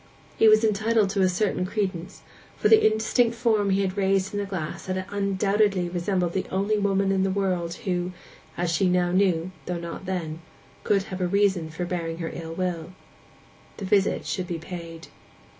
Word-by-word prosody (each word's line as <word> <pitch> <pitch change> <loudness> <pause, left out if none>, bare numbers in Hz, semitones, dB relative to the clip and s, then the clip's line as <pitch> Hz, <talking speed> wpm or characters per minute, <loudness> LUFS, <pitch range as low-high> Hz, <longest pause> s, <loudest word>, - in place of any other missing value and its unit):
He 225 - +5
was 215 +1 +6
entitled 215 -1 +2
to 200 -1 0
a 185 - +4
certain 185 0 0
credence, 185 -2 -3 0.3
for - - +2
the 440 - +7
indistinct 225 +2 +2
form 220 -4 +2
he 195 +1 +2
had 185 -1 -2
raised 195 -1 +1
in 205 - -1
the 200 - -3
glass 180 -5 -5
had 185 0 -2
undoubtedly 200 -1 +1
resembled 175 0 -1
the 190 - -2
only 200 +3 0
woman 195 -1 +1
in 190 -1 +2
the 195 - +1
world 185 -3 -1
who—as 180 -3 -4
she 180 +3 +2
now 180 -1 +2
knew, 185 -2 +2 0.2
though 180 - -2
not 170 +2 -7
then—could 175 +3 -3
have 185 -1 -6
a 180 - +2
reason 190 -4 +2
for 165 +3 -4
bearing 170 -2 -3
her 165 -1 -4
ill 165 -1 -6
will. 180 -1 -3 0.8
The 200 - -5
visit 195 0 +2
should 185 -2 -3
be 170 - -3
paid. 165 -1 -8
190 Hz, 175 wpm, -25 LUFS, 175-200 Hz, 0.8 s, the